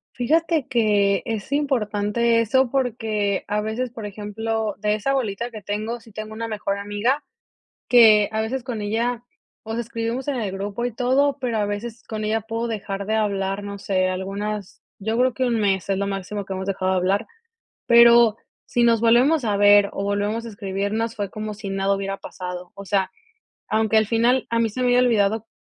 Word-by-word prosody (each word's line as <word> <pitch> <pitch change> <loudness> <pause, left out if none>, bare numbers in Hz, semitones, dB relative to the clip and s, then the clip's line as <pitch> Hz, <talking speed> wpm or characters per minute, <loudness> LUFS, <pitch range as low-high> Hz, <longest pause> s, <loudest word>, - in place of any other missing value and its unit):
Fíjate, 315 +3 +1
que 205 -4 +2
es 225 +1 -4
importante 235 -4 +1
eso, 255 +3 +2
porque 220 -6 -1
a 210 0 0
veces, 225 +3 -3
por 225 -3 -7
ejemplo, 215 +1 -3
de 210 +1 +1
esa 215 +6 -1
bolita 235 -2 -2
que 215 - -8
tengo, 215 +4 -3
sí 225 0 -17
tengo 215 +1 -7
una 230 +1 -4
mejor 205 -2 -3
amiga, 205 +8 -1 0.7
que 215 -4 +7
a 220 - 0
veces 240 +3 -3
con 235 -5 -4
ella, 230 +3 -1 0.4
o 220 - -6
sea, 230 - -1
escribimos 230 +2 -4
en 285 -2 -1
el 215 -5 -2
grupo 200 +4 -4
y 245 - -2
todo, 265 +4 +1
pero 245 -4 -1
a 205 - +1
veces 220 +3 -5
con 215 -1 -5
ella 220 +1 0
puedo 225 +2 -3
dejar 200 -3 -4
de 215 - 0
hablar, 200 -2 -1
no 200 0 -6
sé, 185 -2 0
algunas 195 +2 -4 0.2
yo 220 +3 -2
creo 255 0 +3
que 260 - 0
1 235 -3 +1
mes, 195 -3 0
es 195 -1 0
lo 200 - -1
máximo 200 +1 -4
que 195 - -7
hemos 190 0 -4
dejado 190 -1 0
de - - +1
hablar. 190 +3 +1 0.6
Pero, 235 -2 +7 0.3
si 240 - +1
nos 230 -2 +4
volvemos 245 +5 +4
a 205 -2 +1
ver 205 0 +6
o 195 - -3
volvemos 205 +3 -1
a - - -6
escribirnos, 205 +2 -3
fue 205 -2 -3
como 215 0 -5
si 205 -1 -7
nada 195 0 +1
hubiera 195 0 -3
pasado. 180 -2 -7
O 200 - -9
sea, 190 -1 +1 0.6
aunque 220 0 +1
al 220 0 +4
final 235 +3 +2
a 230 - +1
mí 230 - +2
se 255 +4 -4
me 250 - +2
haya 245 - +4
olvidado 220 -3 +2
215 Hz, 200 wpm, -23 LUFS, 200-235 Hz, 0.7 s, que